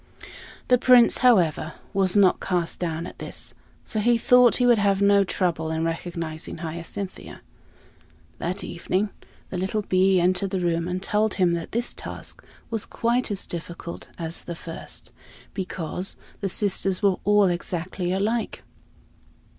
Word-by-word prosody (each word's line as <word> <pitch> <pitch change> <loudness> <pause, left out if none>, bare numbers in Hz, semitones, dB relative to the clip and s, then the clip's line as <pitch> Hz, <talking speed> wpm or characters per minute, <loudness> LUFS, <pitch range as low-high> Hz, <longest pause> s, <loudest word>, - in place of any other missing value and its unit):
The 250 -1 +5
Prince, 245 -1 +6
however, 170 - +3 0.2
was 195 0 +2
not 195 -3 +5
cast 175 -3 -1
down 165 -1 -2
at - - -10
this, - - -4 0.3
for 220 - -4
he 235 +2 +3
thought 250 +1 +5
he 250 - +2
would 240 -3 +5
have 200 -1 +2
no 200 0 +5
trouble 170 -4 -1
in 160 0 -1
recognizing 165 -1 -4
Hyacinthia. 170 +4 -6 1.0
That 180 +4 -3
evening 185 +4 -1 0.4
the 180 - -2
little 195 +3 -1
bee 190 0 +3
entered 185 +2 +2
the 190 -1 -1
room 170 -1 0
and 180 +1 -3
told 210 +2 +1
him 180 -3 +3
that 170 -1 -4
this 240 +2 -2
task - - -7 0.3
was 225 -2 -1
quite 235 +2 0
as 205 -2 -3
difficult 170 0 -7
as 165 -1 -5
the 170 - -5
first, 165 0 -7 0.4
because 185 -1 -4 0.2
the 195 - -1
sisters 195 0 +1
were 195 -2 +4
all 205 0 +5
exactly 175 +1 -2
alike. 215 +5 -1
185 Hz, 145 wpm, -25 LUFS, 170-205 Hz, 1.0 s, Prince